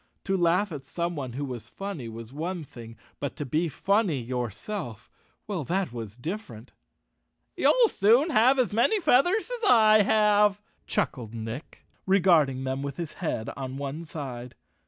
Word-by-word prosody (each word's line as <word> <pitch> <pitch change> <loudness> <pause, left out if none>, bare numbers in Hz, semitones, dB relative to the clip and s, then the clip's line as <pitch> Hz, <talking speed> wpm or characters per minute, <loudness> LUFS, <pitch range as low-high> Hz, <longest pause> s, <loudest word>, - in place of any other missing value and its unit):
To 195 - 0
laugh 180 +3 +2
at 145 -4 -6
someone 155 -6 -3
who 140 +3 -3
was 120 -4 -7
funny 195 -12 -6
was 115 +2 -9
one 170 +3 -4
thing, 115 -5 -12 0.2
but 140 -3 -4
to 145 - -4
be 160 +6 0
funny 195 0 +1
yourself— 120 - -5 0.3
well, 195 -7 -3
that 180 -5 -1
was 115 -2 -7
different! 135 - -7 0.8
"You'll - - +4
soon 245 - +3
have 255 +2 +5
as 250 -5 +1
many 240 - +3
feathers 355 - +3
as 425 - +3
I 215 -2 +6
have," 210 -1 +3 0.3
chuckled 115 -4 -2
Nick, 115 +6 -7 0.2
regarding 165 -9 +3
them 130 +1 -2
with 140 -1 -5
his 170 -3 -5
head 115 -10 -2
on 130 0 -5
one 140 +3 -5
side. 125 -6 -7
160 Hz, 155 wpm, -27 LUFS, 125-205 Hz, 0.8 s, I